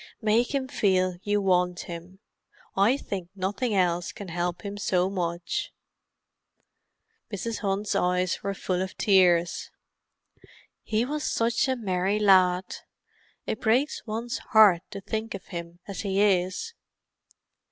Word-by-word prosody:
Make 230 +5 +2
him 265 -1 -1
feel 185 -6 +1
you 205 0 +1
want 180 -2 +2
him; 175 +3 -9 0.5
I 210 +7 +4
think 190 -9 -5
nothing 205 +4 -1
else 175 -2 +1
can 200 -3 -9
help 175 +2 -2
him 200 0 -4
so 185 -1 +1
much." 175 -2 -3 1.6
Mrs. 220 +3 -3
Hunt's 200 0 -1
eyes 180 0 +1
were 200 0 -3
full 185 -1 -2
of 190 0 -5
tears. 175 -4 +3 1.1
"He 220 +2 0
was 300 +3 -3
such 230 +3 +1
a 260 - +1
merry 195 -3 0
lad—it 185 +1 0
breaks 245 +6 +1
one's 230 +2 -3
heart 205 -6 +5
to 200 -2 -7
think 220 +3 -4
of 185 - -9
him 170 0 -7
as 200 - -5
he 195 -1 -1
is." 190 - +1
195 Hz, 130 wpm, -26 LUFS, 180-215 Hz, 1.6 s, heart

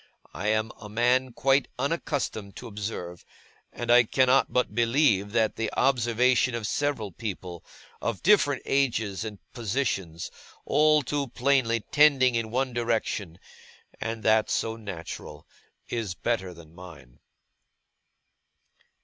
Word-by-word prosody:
I 100 - -4
am 110 +1 +1
a 105 - -9
man 125 +4 +2
quite 135 +3 +2
unaccustomed 135 -8 -2
to - - -9
observe; 100 -5 -6 0.5
and 120 0 -2
I 120 0 +7
cannot 130 +3 +3
but 125 -4 0
believe 115 -4 +2
that 110 -2 +1
the 115 -1 -2
observation 125 -1 +2
of 115 -2 -4
several 130 -4 -1
people, 90 -3 -6 0.4
of 115 -4 -3
different 170 -9 +4
ages 115 -8 0
and 110 -2 -6 0.2
positions, 105 -8 -2 0.3
all 150 0 +4
too 140 +1 -2
plainly 125 -2 +1
tending 135 -1 +4
in 115 -1 -1
one 130 +2 -1
direction 110 -7 -2 0.6
(and 115 0 -4
that 110 0 +3
so 115 0 -1
natural), 100 -7 -8 0.4
is 110 -6 -3
better 95 -3 -2
than 85 -2 -14
mine. 80 -9 -13
115 Hz, 125 wpm, -27 LUFS, 105-130 Hz, 0.6 s, I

